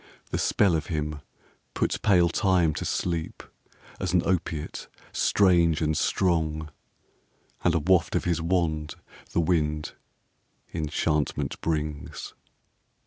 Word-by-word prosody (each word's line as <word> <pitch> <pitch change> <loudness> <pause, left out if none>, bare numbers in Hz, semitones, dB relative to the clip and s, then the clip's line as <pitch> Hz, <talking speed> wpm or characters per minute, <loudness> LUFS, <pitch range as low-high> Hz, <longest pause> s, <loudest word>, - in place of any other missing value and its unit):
The - - -1
spell 95 -5 +3
of 80 - -2
him 75 -2 -3 0.5
puts - - 0
pale 90 -5 +4
Time 90 -3 +2
to - - -4
sleep, 85 -3 -2 0.6
as 95 -2 -2
an 90 - +4
opiate 85 -4 -2 0.2
strange 85 -5 +3
and 80 -1 +1
strong, 80 -4 0 0.9
And 85 -1 +3
a - - +3
waft 90 +2 +2
of - - +1
his 85 -2 0
wand, 80 -3 0 0.4
the - - +2
wind, 75 -3 0 0.8
enchantment 75 -1 -1
brings. 75 -2 -3
80 Hz, 115 wpm, -26 LUFS, 75-90 Hz, 0.9 s, pale